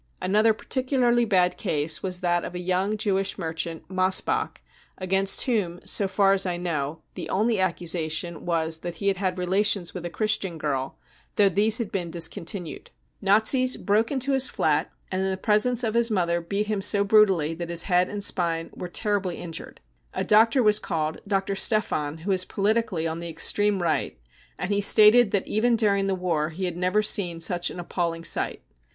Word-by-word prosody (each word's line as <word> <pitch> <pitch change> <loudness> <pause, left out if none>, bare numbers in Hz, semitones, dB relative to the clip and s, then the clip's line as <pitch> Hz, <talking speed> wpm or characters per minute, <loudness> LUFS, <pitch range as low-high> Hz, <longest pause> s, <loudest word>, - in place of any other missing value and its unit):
Another 215 +4 +2
particularly 245 +1 0
bad 180 -4 +1
case 155 -4 -1
was 185 -1 -3
that 175 -1 0
of 180 - -7
a - - -4
young: 185 +4 -1
Jewish 195 -2 0
merchant, 165 -1 -5
Mossbach, 185 +1 0 0.4
against 195 +1 +2
whom, 200 -9 -1
so 200 - +1
far 195 +1 +2
as 195 -1 +2
I 180 -2 -2
know, 160 -3 -4
the - - -7
only 215 +2 0
accusation 170 -2 -2
was 160 -2 -1
that 175 0 -6
he 200 +4 -1
had 195 - -1
had 185 -1 -2
relations 190 0 +1
with 180 - -7
a 175 - -4
Christian 205 -3 -1
girl, 135 -3 -3 0.4
though 200 -1 +4
these 210 +4 +2
had 235 -5 -4
been 175 -3 -3
discontinued. 170 +1 -4 0.3
Nazis 220 +6 +3
broke 215 +3 0
into 275 0 -1
his 265 -1 +3
flat - - 0 0.2
and 185 0 -1
in 190 - -1
the 190 - -3
presence 220 +5 +2
of 220 -2 -1
his 235 0 +3
mother 170 -4 0
beat 200 +5 -2
him 210 -2 -2
so 200 +1 +4
brutally 195 -7 +3
that 170 +1 -7
his 170 -1 +1
head 180 -1 +2
rind 205 -1 -5
spine 165 -4 -1
were 180 - -7
tefribly 200 -2 -1
injured. 165 -2 -8 0.3
A - - -1
doctor 225 +4 +4
was 210 -1 +4
called, 155 -3 -3
Dr. 195 -1 -1
Stephan, 160 -8 0
who 200 - -1
is 185 -1 +2
politi 215 +5 0
cally 165 -5 -3
on 160 +1 -4
the 170 0 -6
extreme 200 +4 0
Right, 170 - -1 0.4
and 180 +4 -4
he 200 - 0
stated 215 +3 +6
that 200 -2 -1
even 230 +3 +1
during 200 -3 +1
the 195 - 0
war 165 -4 -1
he 180 +4 -5
had 175 -2 -4
never 185 +4 0
seen 175 -5 0
such 175 +1 -1
an - - -9
appalling 170 -1 -3
sight. - - -1
190 Hz, 190 wpm, -24 LUFS, 170-210 Hz, 0.4 s, stated